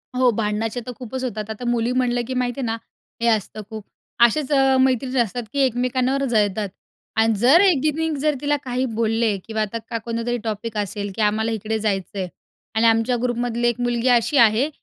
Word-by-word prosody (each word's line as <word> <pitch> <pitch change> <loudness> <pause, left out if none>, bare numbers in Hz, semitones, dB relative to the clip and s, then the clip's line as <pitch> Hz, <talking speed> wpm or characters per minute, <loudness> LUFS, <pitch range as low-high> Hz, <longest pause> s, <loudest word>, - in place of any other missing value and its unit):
हो, 255 0 +4
भांडणाचे 215 +1 -2
तर 250 - -5
खूपच 255 +1 -5
होतात. 215 -4 -4
आता 220 +3 -6
मुली 240 0 +1
म्हणलं 250 -1 +1
की 260 - -3
माहिती 250 0 -1
आहे 265 - -1
ना, 225 0 -1 0.4
हे 235 - +2
असतं 215 -1 0
खूप. 220 -2 -7 0.4
असेच 280 +4 0
अ, 270 -2 +4
मैत्रिणी 260 0 +1
असतात 235 +1 0
की 280 - -1
एकमेकांवर 255 +2 0
जळतात 210 -4 +1 0.5
आणि 225 0 +4
जर 265 - +6
एकीने 320 -3 +2
जर 300 +1 +1
तिला 290 0 +1
काही 255 0 -1
बोलले 225 -1 +1
किंवा 220 -1 -2
आता 215 +2 -2
का 230 - -2
कोणतरी 230 +1 -2
टॉपिक 220 0 -4
असेल 205 0 -3
की - - -2
आम्हाला 215 +2 +1
इकडे 220 0 -2
जायचंय 195 -2 -2 0.5
आणि 220 +1 +3
आमच्या 225 +2 +3
ग्रुपमधली 240 -1 0
एक 240 0 0
मुलगी 240 0 0
अशी 240 +3 +3
आहे, 230 +3 +5
235 Hz, 185 wpm, -22 LUFS, 220-255 Hz, 0.5 s, जर